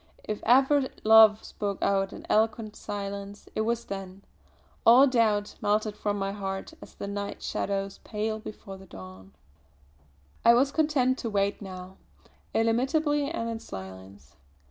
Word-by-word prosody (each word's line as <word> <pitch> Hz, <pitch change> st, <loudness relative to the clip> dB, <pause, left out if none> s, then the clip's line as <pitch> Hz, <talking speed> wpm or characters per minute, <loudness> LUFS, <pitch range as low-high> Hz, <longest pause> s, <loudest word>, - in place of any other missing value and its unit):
If 215 Hz, -1 st, -4 dB
ever 265 Hz, +2 st, +4 dB
love 220 Hz, -1 st, +7 dB
spoke 200 Hz, -2 st, -4 dB
out 195 Hz, 0 st, +1 dB
in -, -, -10 dB
eloquent 220 Hz, 0 st, +1 dB
silence 200 Hz, 0 st, -6 dB
it -, -, -1 dB
was 235 Hz, +1 st, -1 dB
then, 195 Hz, 0 st, -7 dB, 0.6 s
all 245 Hz, +4 st, +8 dB
doubt 220 Hz, -6 st, +1 dB
melted 210 Hz, 0 st, 0 dB
from 205 Hz, -1 st, -2 dB
my 195 Hz, 0 st, -2 dB
heart, 195 Hz, -1 st, -5 dB
as -, -, -13 dB
the -, -, -6 dB
night 200 Hz, 0 st, -5 dB
shadows 195 Hz, 0 st, -3 dB
pale 215 Hz, 0 st, -3 dB
before 210 Hz, -2 st, -9 dB
the 190 Hz, -, -14 dB
dawn. 95 Hz, -, -12 dB, 1.1 s
I 235 Hz, -, +7 dB
was 270 Hz, +3 st, +3 dB
content 280 Hz, -4 st, +1 dB
to 230 Hz, -, -3 dB
wait 200 Hz, -1 st, 0 dB
now, 185 Hz, -1 st, -9 dB, 0.6 s
illimitably 280 Hz, +6 st, +1 dB
and 275 Hz, -8 st, -3 dB
in 230 Hz, -1 st, -4 dB
silence. 95 Hz, -, -11 dB
210 Hz, 145 wpm, -27 LUFS, 195-230 Hz, 1.1 s, all